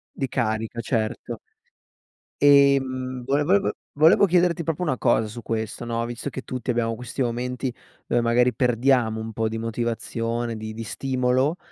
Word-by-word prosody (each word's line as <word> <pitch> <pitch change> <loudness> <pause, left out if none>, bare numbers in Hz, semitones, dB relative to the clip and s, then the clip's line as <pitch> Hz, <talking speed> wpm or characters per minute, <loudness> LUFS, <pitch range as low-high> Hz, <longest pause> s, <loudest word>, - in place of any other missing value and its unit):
Di 135 - -2
carica, 115 -2 -2
certo. 110 -2 -2 1.0
Ehm, 135 -3 +4
vole 140 +3 +1
vol 195 +6 +4
vo - - 0 0.2
volevo 160 +7 +6
chiederti 175 -2 +2
proprio 165 +2 -2
una 145 -7 0
cosa 110 +1 +2
su 115 +2 -9
questo, 110 +1 -3
no, 115 0 -2
visto 120 +3 -5
che 130 - -5
tutti 125 -1 -3
abbiamo 115 -1 0
questi 125 +3 -6
momenti, 125 +1 -2 0.3
dove 120 - +2
magari 120 +2 +3
perdiamo 125 -1 +2
un 110 0 -6
po' 110 +1 0
di 110 0 -4
motivazione, 115 0 -2
di 110 0 -6
di 115 +1 -6
stimolo, 130 - 0
125 Hz, 160 wpm, -24 LUFS, 115-135 Hz, 1.0 s, volevo